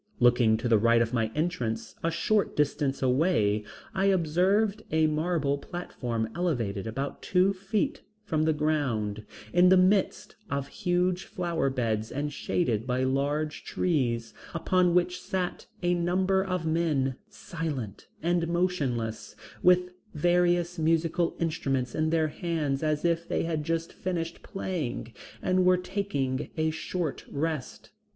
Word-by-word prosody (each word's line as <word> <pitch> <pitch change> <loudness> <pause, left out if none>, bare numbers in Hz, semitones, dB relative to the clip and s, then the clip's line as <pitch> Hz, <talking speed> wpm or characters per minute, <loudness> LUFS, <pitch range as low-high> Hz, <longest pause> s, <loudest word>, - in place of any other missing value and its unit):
Looking 120 -2 +5
to 120 +2 -2
the 115 -2 +4
right 115 +2 +4
of 115 -1 +1
the 115 -3 +1
entrance, 125 -9 -2
a 165 - +2
short 195 +5 +1
distance 140 -2 0
away, 125 - +2 0.3
I 190 0 +1
observed 195 +4 +2
a 160 0 +3
marble 155 -2 0
platform 120 -10 -4
elevated 115 - -1
about 135 +6 -4
two 185 +2 +3
feet 195 +2 -1 0.2
from 160 -7 0
the 160 0 +3
ground, 130 -9 -1 0.3
in 180 +1 +6
the 190 - +7
midst 185 +1 +2
of 140 -2 -2
huge 180 +1 0
flower 175 -8 -1
beds 110 -4 -1
and 145 +2 -3
shaded 120 -8 -1
by 125 +1 +1
large 145 +4 -1
trees, 120 -9 0 0.2
upon 180 +1 +2
which 180 0 +1
sat 185 -2 -3 0.2
a 175 0 +3
number 185 +2 +2
of 185 -3 -2
men, 155 -5 +1
silent 145 - -5 0.2
and 170 0 +1
motionless, 145 -11 -1 0.3
with 180 0 +4 0.2
various 175 +1 +2
musical 165 +1 +1
instruments 135 -6 -1
in 155 0 +1
their 160 -1 +2
hands 150 -5 -2
as 155 0 0
if 170 0 +1
they - - 0
had 160 -2 -1
just 165 +1 -2
finished 170 -2 -3
playing 150 - -4 0.3
and 185 0 +3
were 180 0 +5
taking 180 -9 -2
a 160 0 +1
short 160 -1 -3
rest. 155 -2 -4
160 Hz, 140 wpm, -28 LUFS, 130-180 Hz, 0.3 s, the